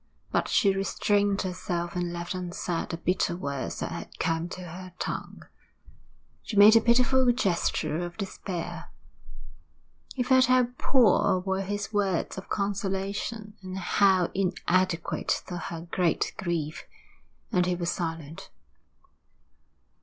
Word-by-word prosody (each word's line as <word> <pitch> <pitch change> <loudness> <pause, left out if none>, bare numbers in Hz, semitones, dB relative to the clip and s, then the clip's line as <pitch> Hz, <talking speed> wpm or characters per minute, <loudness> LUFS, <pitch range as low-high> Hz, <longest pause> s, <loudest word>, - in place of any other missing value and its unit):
But - - +1
she 200 -4 +3
restrained 200 +1 +1
herself 180 -2 -3
and 175 -1 -1
left 175 +1 -4
unsaid 180 -1 -3
the 165 - -3
bitter 175 0 0
words 140 -6 -4
that - - -3
had - - -7
come 165 +1 -1
to 185 - -7
her 180 +1 -9
tongue. - - -5 1.0
She 210 - -5
made 210 +2 +9
a 225 - +7
pitiful 250 +1 +4
gesture 170 -8 0
of 175 -1 -6
despair. 190 -3 -5 1.3
He 255 - 0
felt 260 +1 +5
how 255 -1 +4
poor 245 -7 +4
were 190 +1 -1
his 205 +2 -4
words 195 -4 0
of 190 - -8
consolation, 200 +2 -2
and 185 0 -6
how 190 -1 +3
inadequate 185 -2 0
to 180 - -5
her 165 -1 -5
great 175 -3 +1
grief, 165 -4 -3 0.7
and 180 -1 +2
he 180 - +1
was 175 -1 -1
silent. 165 -3 -5
185 Hz, 130 wpm, -27 LUFS, 175-205 Hz, 1.3 s, made